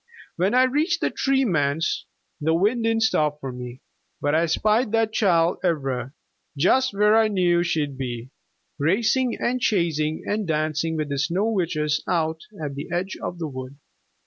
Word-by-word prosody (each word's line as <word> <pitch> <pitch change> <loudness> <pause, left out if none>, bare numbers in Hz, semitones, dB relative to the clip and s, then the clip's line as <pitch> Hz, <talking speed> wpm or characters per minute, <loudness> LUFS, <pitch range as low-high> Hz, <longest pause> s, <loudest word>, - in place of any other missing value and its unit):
When 190 +7 +1
I 255 - +6
reached 305 +7 +1
the - - +1
Tree 270 -1 +1
Man's 155 - 0 0.3
the 160 +2 +1
wind 220 +7 +1
didn't 225 0 +2
stop 150 -8 +1
for 135 -2 -5
me, 125 0 -8 0.4
but 145 +1 0
I 165 +2 +3
spied 215 +7 +1
that 225 -1 +2
child, 175 -5 +2
Ivra, 135 -7 -1 0.4
just 260 - +3
where 210 +2 +3
I 225 -1 +5
knew 180 -4 +2
she'd 150 -6 -1
be, 120 -1 -5 0.5
racing 220 - +1
and 250 +1 -1
chasing 160 -7 0
and 210 -1 -1
dancing 155 +1 -1
with 155 -1 -2
the 140 -1 -2
Snow 180 +9 0
Witches 155 -6 0
out 160 -3 0 0.2
at 145 -3 -4
the 140 +1 -7
edge 185 +2 -2
of 175 - -4
the 165 -2 -3
wood. 130 0 -8
170 Hz, 170 wpm, -24 LUFS, 150-215 Hz, 0.5 s, I